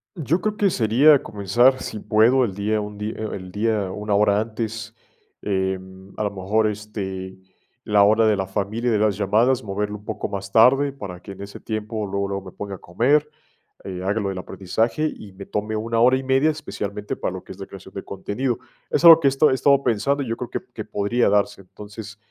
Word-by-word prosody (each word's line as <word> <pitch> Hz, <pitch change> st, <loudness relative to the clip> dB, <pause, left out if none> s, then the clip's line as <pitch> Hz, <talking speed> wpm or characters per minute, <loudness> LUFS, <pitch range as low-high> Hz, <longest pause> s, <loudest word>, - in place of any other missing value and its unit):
Yo 165 Hz, +1 st, 0 dB
creo 215 Hz, +1 st, -2 dB
que 200 Hz, -1 st, +3 dB
sería 135 Hz, -, +4 dB
comenzar, 120 Hz, +6 st, +2 dB
si 110 Hz, -, -5 dB
puedo, 115 Hz, +6 st, +4 dB
el 100 Hz, -, -4 dB
día 105 Hz, +2 st, -1 dB
un 105 Hz, 0 st, -6 dB
dí 105 Hz, +1 st, -2 dB
e -, -, -7 dB
el 95 Hz, -2 st, -8 dB
día 105 Hz, -1 st, 0 dB
una 105 Hz, +2 st, -3 dB
hora 100 Hz, 0 st, +3 dB
antes, 110 Hz, 0 st, -5 dB, 0.5 s
eh, 95 Hz, -1 st, -1 dB, 0.4 s
a -, -, -1 dB
lo 105 Hz, -, 0 dB
mejor, 100 Hz, +3 st, 0 dB
este, 100 Hz, -3 st, -5 dB, 0.5 s
la 105 Hz, -1 st, +4 dB
hora 110 Hz, +2 st, +4 dB
de 105 Hz, -, +4 dB
la 95 Hz, -, -1 dB
familia 105 Hz, +5 st, -2 dB
de 110 Hz, -, +2 dB
las 105 Hz, -2 st, +2 dB
llamadas, 115 Hz, +6 st, +2 dB
moverlo 105 Hz, +1 st, -3 dB
un 105 Hz, -, -19 dB
poco 110 Hz, -, -4 dB
más 100 Hz, -1 st, -5 dB
tarde, 135 Hz, +6 st, +5 dB
para 100 Hz, -10 st, -8 dB
que 95 Hz, -, -11 dB
en 95 Hz, 0 st, -10 dB
ese 100 Hz, 0 st, -8 dB
tiempo 110 Hz, 0 st, -4 dB
luego, 100 Hz, 0 st, -2 dB
luego 100 Hz, -1 st, -4 dB
me 95 Hz, -, -9 dB
ponga 100 Hz, 0 st, -6 dB
a -, -, -11 dB
comer, 135 Hz, +13 st, +1 dB, 0.6 s
eh, 90 Hz, -2 st, -6 dB
haga 100 Hz, +4 st, 0 dB
lo 100 Hz, -2 st, -2 dB
del 95 Hz, -1 st, -4 dB
aprendizaje, 105 Hz, -, -1 dB
y 105 Hz, -, -11 dB
me 100 Hz, +1 st, -10 dB
tome 105 Hz, +1 st, -3 dB
una 115 Hz, +1 st, -1 dB
hora 125 Hz, +3 st, +5 dB
y 135 Hz, -, -5 dB
media, 135 Hz, +3 st, +3 dB
especialmente 105 Hz, -8 st, -4 dB
para -, -, -3 dB
lo -, -, -8 dB
que -, -, -12 dB
es -, -, -10 dB
la -, -, -7 dB
creación -, -, -12 dB
de -, -, -5 dB
contenido, 120 Hz, +3 st, -3 dB, 0.3 s
es -, -, 0 dB
algo 165 Hz, -1 st, +10 dB
que 145 Hz, -, +2 dB
he -, -, +7 dB
estado 135 Hz, +3 st, +3 dB
he -, -, +3 dB
estado 140 Hz, +1 st, +3 dB
pensando, 140 Hz, +6 st, +1 dB
yo 115 Hz, -3 st, -3 dB
creo 125 Hz, -, -5 dB
que -, -, -3 dB
que -, -, -6 dB
podría 105 Hz, +4 st, +1 dB
darse, 100 Hz, 0 st, +1 dB
entonces, 105 Hz, +3 st, -10 dB
105 Hz, 220 wpm, -22 LUFS, 100-120 Hz, 0.6 s, algo